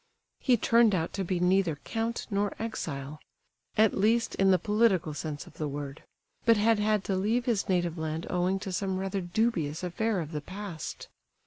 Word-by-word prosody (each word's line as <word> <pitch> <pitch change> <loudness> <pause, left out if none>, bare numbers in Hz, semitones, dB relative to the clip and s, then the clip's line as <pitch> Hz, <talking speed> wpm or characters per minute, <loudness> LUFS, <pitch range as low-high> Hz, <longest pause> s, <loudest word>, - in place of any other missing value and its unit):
He 250 -3 +3
turned 230 -2 +4
out 165 -2 -2
to 195 - -2
be 180 0 -1
neither 180 -2 +3
count 225 +10 -3
nor 200 0 0
exile—at 150 - -3
least, 225 +4 +2
in 195 0 +3
the 185 - +6
political 200 -4 +2
sense 150 -1 -5
of - - -17
the 155 - -1
word—but 145 +10 -2
had 220 +1 +3
had 210 -1 +2
to 195 - -1
leave 220 +6 +1
his 225 -6 0
native 175 -2 0
land 160 +1 -3
owing 180 +2 +1
to 195 - -4
some 190 0 -1
rather 195 +1 -2
dubious 175 -5 0
affair 200 +4 0
of 160 -2 -5
the 150 -2 -3
past. 185 -2 -7
190 Hz, 175 wpm, -29 LUFS, 160-215 Hz, -, the